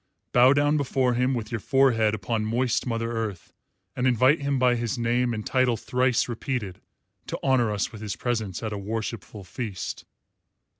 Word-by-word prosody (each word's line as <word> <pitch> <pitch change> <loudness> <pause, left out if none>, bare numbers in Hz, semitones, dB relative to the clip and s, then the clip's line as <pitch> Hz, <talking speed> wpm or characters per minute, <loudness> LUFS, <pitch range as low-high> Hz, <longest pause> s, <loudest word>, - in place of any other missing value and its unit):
Bow 125 +2 +6
down 145 +1 +3
before 130 -3 +1
him, 125 +2 +1
with 115 -1 -5
your 115 - -2
forehead 115 -4 +3
upon 110 +2 -2
moist 120 +3 0
Mother 115 -1 -2
Earth, 110 -6 -4 0.4
and 125 +1 +1
invite 130 +5 +4
him 140 -1 0
by 125 -1 +4
his 120 +2 -2
name 120 +1 +1
and 110 -2 -4
title 130 -3 +2
thrice 125 +2 +1
repeated 120 -5 -4 0.5
to - - -3
honour 130 -4 +3
us 105 -2 -1
with 110 - -10
his 105 -2 -4
presence 110 -5 -3
at 110 -1 -3
a 100 - -4
worshipful 110 0 -5
feast. 100 0 -6
120 Hz, 170 wpm, -25 LUFS, 110-130 Hz, 0.5 s, Bow